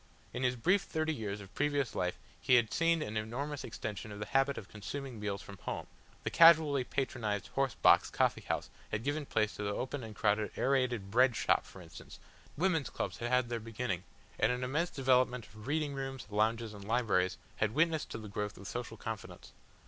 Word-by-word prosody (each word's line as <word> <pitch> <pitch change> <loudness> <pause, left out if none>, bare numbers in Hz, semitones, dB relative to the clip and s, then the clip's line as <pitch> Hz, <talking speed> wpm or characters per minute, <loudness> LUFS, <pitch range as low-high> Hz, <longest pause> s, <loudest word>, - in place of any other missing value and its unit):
In 125 - -3
his 125 -1 +2
brief 180 +11 +3
thirty 160 -4 -1
years 105 -6 -4
of 100 0 -13
previous 145 -2 0
life 90 0 -1 0.2
he 125 - +5
had 115 -3 +3
seen 165 -1 +3
an 110 -3 -4
enormous 135 +7 -3
extension 105 -1 -5
of 105 - -7
the 105 - -4
habit 135 +2 +2
of 95 - -7
consuming 120 +5 -6
meals 100 -2 -3
from 100 -2 -11
home, - - -4 0.4
the - - -2
casually 160 -5 +7
patronised 120 -6 -2
horse 135 -2 0
box - - +5
coffee - - +1
house - - -3 0.2
had 110 +1 -2
given 145 +1 -1
place 110 -2 +1
to - - -4
the 100 - -1
open 130 +1 -3
and 110 -1 -8
crowded 105 0 +1
Aerated 125 -7 +1
Bread 125 +1 +5
Shop - - +2
for - - -11
instance, - - -12 0.4
women's 165 -3 +1
clubs - - -3
had 120 - -2
had 125 -1 +2
their 120 -1 -2
beginning, 115 -4 -3 0.4
and 110 - +4
an 125 0 -2
immense 150 +7 0
development 125 -3 +2
of 105 +1 -13
reading 150 0 0
rooms, 135 -1 -5
lounges 110 +1 +1
and 100 -1 -9
libraries 105 -5 +1 0.2
had 110 +2 0
witnessed 160 0 +2
to - - -5
the 110 -1 -8
growth 105 +1 -4
of 100 - -9
social 120 -1 -5
confidence. 110 -1 -7
120 Hz, 200 wpm, -33 LUFS, 105-140 Hz, 0.4 s, casually